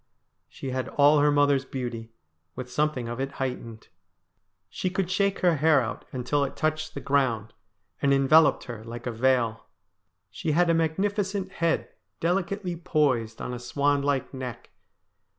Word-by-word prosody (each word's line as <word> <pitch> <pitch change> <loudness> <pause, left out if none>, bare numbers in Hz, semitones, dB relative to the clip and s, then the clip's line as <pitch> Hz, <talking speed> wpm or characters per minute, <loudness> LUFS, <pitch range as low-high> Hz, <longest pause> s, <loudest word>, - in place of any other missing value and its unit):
She 135 - -6
had 130 0 -2
all 145 +1 +5
her 145 +1 +4
mother's 145 -2 +3
beauty, 120 -4 -5 0.4
with 125 -1 -7
something 150 -5 0
of 120 +2 -5
it 135 +1 -3
heightened. 120 -4 -5 0.8
She 185 - -3
could 185 0 -2
shake 200 +1 +1
her 175 -3 +3
hair 155 0 +5
out 120 - -4
until 130 +3 0
it 140 - -4
touched 155 0 -1
the - - -3
ground, 120 -6 0 0.5
and 140 - +3
enveloped 140 +3 +5
her 120 -4 -8
like 115 +1 -8
a 125 - -1
veil. 120 -1 +1 0.6
She 155 - -2
had 170 +1 +4
a - - +3
magnificent 190 +4 0
head 170 -3 0 0.3
delicately 180 +1 -1
poised 145 -10 0
on 125 - -4
a 120 - -5
swan 140 +3 +1
like 140 -1 -1
neck. 130 -3 -7
140 Hz, 155 wpm, -26 LUFS, 125-165 Hz, 0.8 s, all